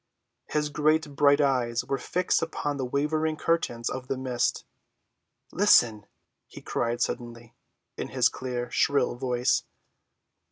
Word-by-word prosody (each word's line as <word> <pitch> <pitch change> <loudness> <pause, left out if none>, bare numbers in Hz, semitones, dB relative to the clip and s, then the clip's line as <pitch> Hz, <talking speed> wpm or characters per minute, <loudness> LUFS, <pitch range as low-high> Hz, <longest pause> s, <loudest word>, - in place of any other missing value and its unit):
His 150 0 -1
great 155 0 +1
bright 145 0 +4
eyes 125 -4 +1
were 135 +1 -2
fixed 180 -1 0
upon 150 -3 -3
the 130 - -2
wavering 155 +4 -1
curtains 120 -9 -1
of 125 0 -4
the 135 - -2
mist. 130 -2 -1 0.9
"Listen!" 120 - +4 0.4
he - - -11
cried 120 +1 -2
suddenly, 120 -1 -4 0.4
in - - -4
his - - +3
clear, 125 -1 -4
shrill 140 -4 +2
voice. 125 0 0
130 Hz, 125 wpm, -27 LUFS, 120-150 Hz, 0.9 s, bright